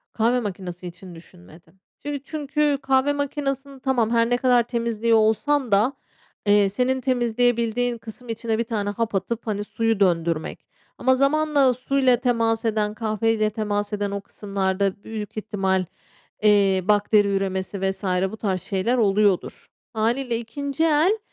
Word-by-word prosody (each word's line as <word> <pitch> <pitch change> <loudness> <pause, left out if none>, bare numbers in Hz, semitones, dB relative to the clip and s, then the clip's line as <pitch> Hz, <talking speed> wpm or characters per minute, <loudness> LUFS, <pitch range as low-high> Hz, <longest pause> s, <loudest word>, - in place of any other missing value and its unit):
Kahve 235 +3 +2
makinesi 185 -4 -6
için 175 0 -11
düşünmedim. 165 - -17 0.2
Şimdi 285 -2 -4
çünkü 295 -1 0
kahve 270 +1 +2
makinesini, 280 -1 -3
tamam, 255 -4 +1
her 230 0 +3
ne 245 - +2
kadar 245 -1 +3
temizliyor 230 -1 +1
olsan 230 +4 +1
da, 210 +7 +3 0.5
eee, 205 -1 +4
senin 255 +5 0
temizleyebildiğin 245 -1 +1
kısım 230 +2 -11
içine 225 0 -2
1 230 - 0
tane 215 -3 -2
hap 215 +1 -2
atıp, 225 +5 -3
hani, 205 -1 -1
suyu 225 0 -1
döndürmek 165 -4 0 0.3
ama 260 +1 +3
zamanla 280 -1 +3
suyla 255 0 +2
temas 230 -2 0
eden, 215 -2 0
kahveyle 215 0 0
temas 210 -1 -2
eden 205 -1 -2
o 200 0 -3
kısımlarda 195 0 -2
büyük 215 -1 -7
ihtimal, 195 -3 0 0.6
eee, 200 -3 +4
bakteri 205 0 +3
üremesi 190 0 -2
vs. 190 +1 -11 0.3
bu 220 - -8
tarz 190 -4 -2
şeyler 205 +6 -1
oluyordur. 205 -3 +1 0.3
Hâliyle 235 +2 0
ikinci 280 +6 -3
el 325 +7 +3
225 Hz, 140 wpm, -23 LUFS, 200-255 Hz, 0.6 s, eee